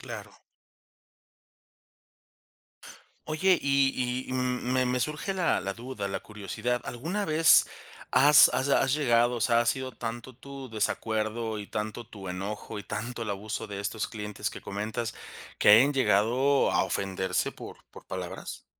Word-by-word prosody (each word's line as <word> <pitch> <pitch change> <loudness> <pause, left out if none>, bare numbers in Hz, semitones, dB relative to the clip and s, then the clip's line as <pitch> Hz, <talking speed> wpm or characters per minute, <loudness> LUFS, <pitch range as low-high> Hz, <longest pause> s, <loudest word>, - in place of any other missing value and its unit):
Claro. - - -9 2.9
Oye, 180 +4 +3
y 135 -2 +1
y, - - -4
mm, 125 -1 -1
me 130 -1 +2
me 125 0 0
surge 155 +8 -2
la 180 -3 +1
la 100 +1 -4
duda, 120 -4 -5
la 100 - -3
curiosidad, 105 +4 -3
¿alguna 170 - -3
vez 155 0 +5 0.5
has 140 +3 +8
has 130 - 0
has 135 -1 +3
llegado?, 120 -4 +3
o 120 - -4
sea, 115 +1 +3
¿ha 120 - 0
sido 130 +1 -1
tanto 120 +1 -6
tu 135 -1 -10
desacuerdo 110 0 -2
y 105 - -7
tanto 110 +3 -5
tu 100 -4 -9
enojo 100 +4 -5
y 100 - -8
tanto 120 +1 -5
el 105 - -3
abuso 105 +3 -4
de 100 -1 -6
estos 100 +2 -2
clientes 105 -2 -5
que - - -9
comentas, 110 +3 -4 0.5
que - - +6
hayan 125 +7 +7
llegado 130 +3 +3
a - - +2
ofenderse 95 -1 -1
por - - -10
por - - -14
palabras? 90 -2 -7
120 Hz, 150 wpm, -28 LUFS, 105-130 Hz, 2.9 s, has